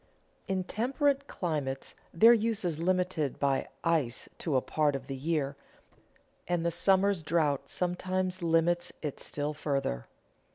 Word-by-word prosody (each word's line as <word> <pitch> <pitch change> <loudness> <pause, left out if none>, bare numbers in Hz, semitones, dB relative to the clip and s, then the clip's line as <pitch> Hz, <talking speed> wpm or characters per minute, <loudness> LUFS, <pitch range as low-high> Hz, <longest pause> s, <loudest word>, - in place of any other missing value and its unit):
In 190 -1 0
temperate 275 - 0
climates 145 -6 -3 0.2
their 225 +8 +7
use 225 -3 +1
is 160 -3 -1
limited 180 -4 0
by 140 -1 +1 0.2
ice 155 -8 0
to 155 -5 -1
a - - +5
part 150 0 +1
of 135 - -5
the 135 - -5
year, 140 -1 -1 0.9
and 175 -1 0
the 170 - +2
summer's 195 +1 +3
drought 150 -4 0
sometimes 185 +1 -1
limits 170 +1 +2
it 150 -3 -4
still 150 +1 -2
further. 140 - -2
165 Hz, 135 wpm, -30 LUFS, 145-185 Hz, 0.9 s, their